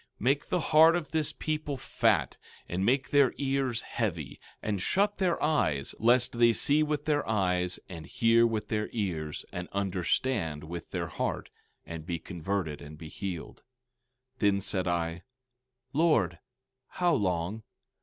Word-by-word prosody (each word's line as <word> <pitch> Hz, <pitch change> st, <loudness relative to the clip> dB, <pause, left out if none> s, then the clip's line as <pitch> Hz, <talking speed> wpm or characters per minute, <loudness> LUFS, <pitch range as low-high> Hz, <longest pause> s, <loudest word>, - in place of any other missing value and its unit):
16:10 -, -, -27 dB
Make 135 Hz, +5 st, +2 dB
the 180 Hz, -, +1 dB
heart 160 Hz, +1 st, +6 dB
of 170 Hz, -3 st, -3 dB
this 155 Hz, -2 st, +2 dB
people 150 Hz, -2 st, -3 dB
fat, 110 Hz, -, +1 dB, 0.3 s
and 90 Hz, +2 st, -2 dB
make 130 Hz, +4 st, +1 dB
their 140 Hz, -3 st, +4 dB
ears 135 Hz, -4 st, 0 dB
heavy, 85 Hz, -, -3 dB, 0.2 s
and 100 Hz, -3 st, -2 dB
shut 200 Hz, -, +1 dB
their 180 Hz, -3 st, +1 dB
eyes—lest 120 Hz, -, +2 dB
they 120 Hz, -1 st, +6 dB
see 145 Hz, +6 st, +3 dB
with 150 Hz, -1 st, -1 dB
their 150 Hz, -5 st, 0 dB
eyes, 90 Hz, -4 st, +1 dB
and 80 Hz, -4 st, -9 dB
hear 115 Hz, 0 st, +4 dB
with 110 Hz, -2 st, -3 dB
their 105 Hz, -1 st, -1 dB
ears, 85 Hz, -9 st, -3 dB
and 90 Hz, 0 st, -5 dB
understand 95 Hz, -, -1 dB
with 85 Hz, +2 st, -7 dB
their -, -, -2 dB
heart, -, -, -3 dB, 0.3 s
and 80 Hz, -2 st, -8 dB
be 85 Hz, -, -1 dB
converted 85 Hz, -2 st, -3 dB
and 75 Hz, +1 st, -10 dB
be 80 Hz, 0 st, -9 dB
healed. 90 Hz, -3 st, -6 dB, 0.8 s
16:11 -, -, -37 dB
Then 100 Hz, -2 st, +3 dB
said 95 Hz, -2 st, -1 dB
I: 85 Hz, 0 st, -1 dB, 0.7 s
Lord, 135 Hz, -, +2 dB, 0.5 s
how 175 Hz, -1 st, +2 dB
long? 95 Hz, -, -1 dB
105 Hz, 150 wpm, -29 LUFS, 85-140 Hz, 0.8 s, heart